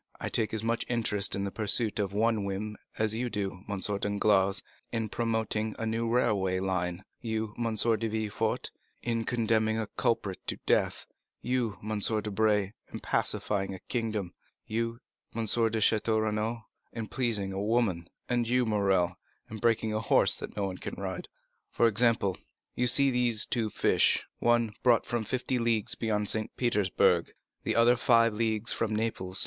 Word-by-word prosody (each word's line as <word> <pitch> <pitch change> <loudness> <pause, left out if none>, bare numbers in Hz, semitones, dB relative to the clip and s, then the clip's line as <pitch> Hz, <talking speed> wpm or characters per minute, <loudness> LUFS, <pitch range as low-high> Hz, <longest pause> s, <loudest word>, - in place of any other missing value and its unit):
I - - -3
take 110 - +1
as 110 -1 -2
much 115 +1 0
interest 105 -4 +1
in 100 - -2
the 100 - -3
pursuit 110 +1 +1
of 100 -2 0
some 110 +1 +1
whim 100 +2 -4 0.2
as 110 -1 +1
you 120 +2 -2
do, 100 -4 -3
M. 100 -1 -2
Danglars, 100 -1 +2 0.3
in 115 -2 -2
promoting 110 -1 -1
a 115 - -3
new 115 +1 -1
railway 100 -6 +1
line; 90 0 -2
you, 110 -2 -3
M. 115 -2 -2
de 115 +1 +2
Villefort, 110 0 -2 0.3
in 115 -1 -1
condemning 110 -2 +1
a 110 - -1
culprit 100 -5 0
to - - -2
death; - - +1 0.4
you, 120 -4 -1
M. 110 -1 -1
Debray, 105 -1 +1 0.2
in - - -6
pacifying 95 -2 -1
a - - -10
kingdom; 105 -4 -3 0.3
you, 115 +2 -3 0.3
M. 115 -1 -1
de 115 +1 +2
Château 110 +1 +2
Renaud, 110 +2 -2 0.3
in 115 -1 -5
pleasing 105 -3 -1
a 95 - -3
woman; 105 -6 0 0.2
and 120 -1 0
you, 125 0 +2
Morrel, 100 -5 +1 0.3
in 110 - -5
breaking 110 -1 +1
a 110 - 0
horse 110 - +5
that - - -8
no 100 - 0
one 95 -1 -5
can - - -6
ride. - - -5 0.4
For - - +2
example, 115 -3 +2 0.4
you 125 - +1
see 140 +2 +6
these 120 -3 +2
two 115 -3 -1
fish; - - +2
one 120 -2 +2
brought 120 -2 +4
from 120 -2 -2
fifty 125 +2 -1
leagues 115 -1 +1
beyond 105 -2 -1
St. 110 +1 -1
Petersburg, 95 -6 +2 0.3
the - - -1
other 120 +1 +5
five 115 -2 +4
leagues 110 0 +1
from 110 -1 -1
Naples. 100 -4 -1
110 Hz, 165 wpm, -29 LUFS, 100-115 Hz, 0.4 s, see